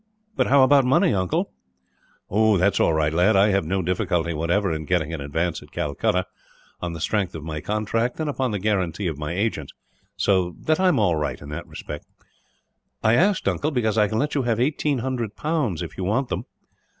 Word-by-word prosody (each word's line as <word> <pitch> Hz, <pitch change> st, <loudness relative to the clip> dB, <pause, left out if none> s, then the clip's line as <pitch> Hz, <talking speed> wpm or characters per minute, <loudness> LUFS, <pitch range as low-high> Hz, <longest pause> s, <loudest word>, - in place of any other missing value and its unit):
"But -, -, +1 dB
how 135 Hz, 0 st, +6 dB
about 140 Hz, +1 st, +5 dB
money, 125 Hz, -3 st, +3 dB
uncle?" 95 Hz, -2 st, -1 dB, 0.8 s
"That 100 Hz, -2 st, +4 dB
is -, -, -1 dB
all -, -, +4 dB
right, 80 Hz, -1 st, +1 dB
lad. 90 Hz, +6 st, +3 dB
I 100 Hz, +2 st, +5 dB
had 95 Hz, -4 st, +1 dB
no 95 Hz, +3 st, -1 dB
difficulty, 90 Hz, -2 st, 0 dB
whatever, 85 Hz, +5 st, 0 dB
in 80 Hz, -1 st, -3 dB
getting 80 Hz, -1 st, 0 dB
an 80 Hz, -, -4 dB
advance 80 Hz, +4 st, -2 dB
at -, -, -16 dB
Calcutta, 80 Hz, +5 st, -1 dB, 0.6 s
on 85 Hz, -1 st, -3 dB
the 85 Hz, -, -6 dB
strength 95 Hz, +1 st, -1 dB
of 80 Hz, -, -6 dB
my 75 Hz, -1 st, -5 dB
contract 110 Hz, +4 st, -1 dB
and 155 Hz, -, -1 dB
upon 135 Hz, -3 st, -1 dB
the 105 Hz, -, -2 dB
guarantee 95 Hz, -2 st, -1 dB
of 80 Hz, -4 st, -2 dB
my 75 Hz, +2 st, -3 dB
agents; 95 Hz, -7 st, -2 dB, 0.4 s
so 90 Hz, -3 st, +1 dB
that 155 Hz, +1 st, +1 dB
I 190 Hz, -, +3 dB
am 175 Hz, -6 st, +3 dB
all 90 Hz, -7 st, +2 dB
right, 75 Hz, -1 st, -2 dB
in 70 Hz, -, -10 dB
that 75 Hz, +3 st, -6 dB
respect." 75 Hz, -, -8 dB, 1.0 s
"I 110 Hz, -, +4 dB
asked, 190 Hz, +9 st, +2 dB
uncle, 150 Hz, -, 0 dB
because 120 Hz, -7 st, 0 dB
I 105 Hz, -1 st, +4 dB
can 110 Hz, +2 st, -2 dB
let 150 Hz, +5 st, 0 dB
you 140 Hz, -, +1 dB
have 115 Hz, -3 st, 0 dB
eighteen 145 Hz, +2 st, +1 dB
hundred 120 Hz, -5 st, -3 dB
pounds, 150 Hz, -, -1 dB
if -, -, -8 dB
you -, -, -2 dB
want 115 Hz, +8 st, 0 dB
them." -, -, -3 dB
100 Hz, 210 wpm, -23 LUFS, 85-120 Hz, 1.0 s, how